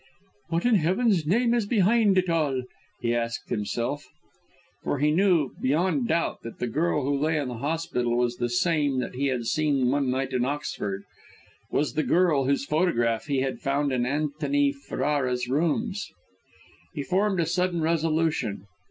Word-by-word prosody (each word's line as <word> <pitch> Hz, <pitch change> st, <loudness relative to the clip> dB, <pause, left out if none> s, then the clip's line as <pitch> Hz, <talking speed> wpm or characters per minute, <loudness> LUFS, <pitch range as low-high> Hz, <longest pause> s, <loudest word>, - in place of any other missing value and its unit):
"What 165 Hz, +4 st, -1 dB
in 245 Hz, -, +4 dB
Heaven's 185 Hz, -1 st, +2 dB
name 235 Hz, +6 st, +3 dB
is 235 Hz, -4 st, +1 dB
behind 210 Hz, -1 st, +3 dB
it 185 Hz, 0 st, +2 dB
all!" 150 Hz, -6 st, 0 dB, 0.4 s
he 115 Hz, -, +1 dB
asked 115 Hz, 0 st, -3 dB
himself. 120 Hz, +7 st, -2 dB, 0.7 s
For -, -, -1 dB
he 150 Hz, +2 st, +2 dB
knew 170 Hz, -5 st, +3 dB
beyond 180 Hz, -, +1 dB
doubt 170 Hz, -3 st, 0 dB
that 115 Hz, -, -9 dB
the -, -, -2 dB
girl 150 Hz, +4 st, 0 dB
who 140 Hz, +2 st, 0 dB
lay 155 Hz, +3 st, +1 dB
in 140 Hz, -4 st, -2 dB
the 120 Hz, -2 st, -6 dB
hospital 140 Hz, -5 st, -1 dB
was 120 Hz, 0 st, 0 dB
the 120 Hz, -1 st, -1 dB
same 145 Hz, +1 st, +1 dB
that 125 Hz, -2 st, -2 dB
he 140 Hz, +3 st, -1 dB
had 125 Hz, -3 st, -1 dB
seen 135 Hz, 0 st, +1 dB
one 140 Hz, -1 st, +1 dB
night 130 Hz, +1 st, -1 dB
at 125 Hz, -1 st, +1 dB
Oxford, 105 Hz, -8 st, -3 dB, 0.7 s
was 150 Hz, -, 0 dB
the 155 Hz, -, +1 dB
girl 160 Hz, -6 st, +2 dB
whose 140 Hz, +1 st, +1 dB
photograph 120 Hz, -9 st, +1 dB
he 140 Hz, -3 st, 0 dB
had 135 Hz, -1 st, -2 dB
found 140 Hz, +1 st, 0 dB
in 125 Hz, -1 st, 0 dB
Antony 145 Hz, 0 st, 0 dB
Ferrara's 135 Hz, -2 st, -1 dB
rooms! 175 Hz, -, 0 dB, 0.9 s
He 145 Hz, -, -2 dB
formed 190 Hz, +3 st, +1 dB
a 170 Hz, -, +2 dB
sudden 180 Hz, +1 st, 0 dB
resolution. 160 Hz, -, 0 dB
145 Hz, 165 wpm, -26 LUFS, 130-170 Hz, 0.9 s, in